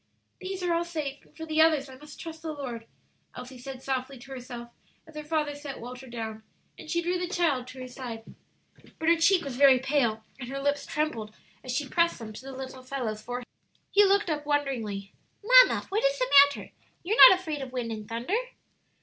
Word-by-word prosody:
"These 375 0 -5
are 350 -1 +1
all 335 0 +1
safe, 305 -5 -5
and - - -25
for 320 - -6
the 315 0 +2
others 310 -4 +4
I 260 - -11
must 300 +3 -13
trust 320 -1 -8
the 320 -1 -4
Lord," 245 -6 -6 0.5
Elsie 250 0 -9
said 260 +1 -8
softly 265 0 -3
to 270 +3 -14
herself 245 -2 -8 0.4
as 320 -1 -17
her 300 - -5
father 300 -1 -1
set 290 -2 -8
Walter 250 +2 -9
down, 220 -2 -6 0.3
and - - -12
she 340 +1 0
drew 355 +1 0
the 360 - -2
child 325 -9 0
to 255 +1 -10
her 255 - -6
side. 245 -3 -7 0.7
But 320 - +1
her 335 - +5
cheek 345 +2 +4
was 260 -3 -5
very 275 -2 +7
pale, 250 -5 0 0.2
and 245 -2 -7
her 275 +1 -4
lips 285 +1 -1
trembled 265 -9 -3 0.3
as 255 - -5
she 270 +3 -1
pressed 335 +5 +2
them 220 -2 -8
to 210 - -9
the 270 +1 -9
little 260 0 -8
fellow's 255 -5 -4
forehead. 245 +2 -5 0.5
He 410 - +6
looked 400 -2 +3
up 295 -1 -2
wonderingly. 245 -10 -2 0.3
"Mamma, - - +6
what 425 +4 0
is - - +2
the - - -1
matter? 285 - -7 0.3
You're 430 +7 +9
not 375 - +4
afraid 310 -6 -4
of 265 -1 -6
wind 245 -3 -3
and 215 -1 -7
thunder?" 235 - -4
275 Hz, 210 wpm, -28 LUFS, 250-325 Hz, 0.7 s, You're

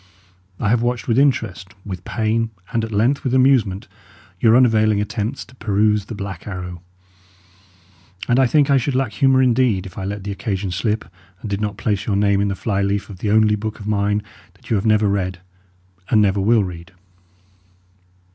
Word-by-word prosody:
I 105 - 0
have 115 +1 +2
watched 120 0 -2
with 115 +1 +2
interest, 115 -9 0
with 95 -3 -6
pain, 110 +2 -1 0.2
and 115 -1 +1
at 110 - -5
length 115 +7 +1
with 130 -1 0
amusement, 125 -8 +2 0.5
your 115 +2 +5
unavailing 110 -4 +3
attempts 105 +5 -3
to 125 - -19
peruse 105 -2 +1
The 115 - -7
Black 100 -3 -7
Arrow; 90 -3 -6 1.5
and 125 +1 +3
I 130 - +5
think 145 +1 +3
I 140 - +5
should 130 +1 -1
lack 130 -4 0
humour 135 +2 +3
indeed, 120 -6 +2
if 95 0 -9
I 95 - -4
let 100 0 -5
the 100 - -4
occasion 100 -1 -3
slip 105 +1 -1 0.4
and 105 - -6
did 100 +1 -2
not 105 -2 -3
place 105 -1 -2
your 105 - +1
name 100 0 +2
in 100 - +1
the 100 - -2
fly 100 0 -1
leaf 100 +1 -1
of 95 - -11
the 105 - -2
only 105 0 +4
book 110 +1 -5
of 105 - -9
mine 105 0 0 0.3
that - - -14
you - - +3
have 100 +2 0
never 110 -1 +3
read 95 -3 -1 0.7
and 110 - +4
never 100 -1 +2
will 110 +2 +3
read. 85 -2 -8
105 Hz, 195 wpm, -20 LUFS, 100-115 Hz, 1.5 s, your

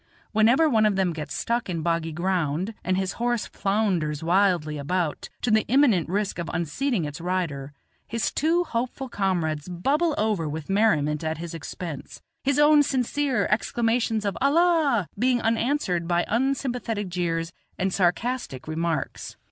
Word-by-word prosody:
Whenever 235 +9 +4
one 220 -6 +4
of 205 - +1
them 190 -3 +1
gets 150 -3 -5
stuck 235 -3 -1
in 165 -3 -2
boggy 165 -1 0
ground, 175 +2 -1
and 185 0 0
his 190 -1 -1
horse 240 -2 +1
flounders 185 -8 -1
wildly 170 -4 +2
about, 165 +2 -2
to 245 - +1
the 220 0 +5
imminent 235 - +3
risk 200 0 -1
of 170 -1 -4
unseating 170 - -1
its 145 +2 -6
rider, 165 -6 -2 0.4
his 230 -1 -1
two 335 +3 +2
hopeful 255 -1 -3
comrades 175 - -1
bubble 290 - +1
over 205 -8 0
with 155 +4 -5
merriment 155 -8 +2
at 160 0 -2
his 170 +1 -6
expense; 165 -1 -7 0.2
his 280 +1 +1
own 295 0 +6
sincere 275 0 0
exclamations 225 0 +1
of 200 - -1
"Allah!" 290 - +3
being 250 +1 +3
answered 225 - 0
by 175 0 +1
unsympathetic 245 -4 -1
jeers 170 -2 -2 0.2
and 190 0 -1
sarcastic 190 - -1
remarks. 165 +1 -3
195 Hz, 150 wpm, -25 LUFS, 165-240 Hz, 0.4 s, own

